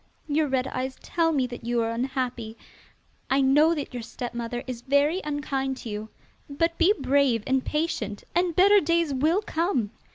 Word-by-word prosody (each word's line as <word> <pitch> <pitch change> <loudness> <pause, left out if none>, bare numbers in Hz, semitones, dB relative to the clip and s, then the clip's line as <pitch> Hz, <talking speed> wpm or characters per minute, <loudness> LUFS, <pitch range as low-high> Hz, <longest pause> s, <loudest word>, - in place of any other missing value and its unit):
Your 300 +1 +1
red 260 -1 0
eyes 260 0 -4
tell 330 -1 +1
me 275 -5 +1
that 245 -1 -8
you 240 +1 0
are 225 - -1
unhappy. 245 -2 -3 0.7
I 270 - +3
know 295 +5 +4
that 290 -3 -5
your 245 - -4
stepmother 240 +1 -5
is 250 -3 -6
very 285 +7 +2
unkind 275 -3 -2
to 235 - -8
you, 210 +1 -5 0.4
but 330 +4 0
be 350 +3 +5
brave 270 -4 +2
and 265 -1 +1
patient, 240 -10 -2
and 350 -1 +1
better 400 +3 +6
days 335 -1 +1
will 315 +10 +2
come. 320 - -1
270 Hz, 170 wpm, -26 LUFS, 245-315 Hz, 0.7 s, better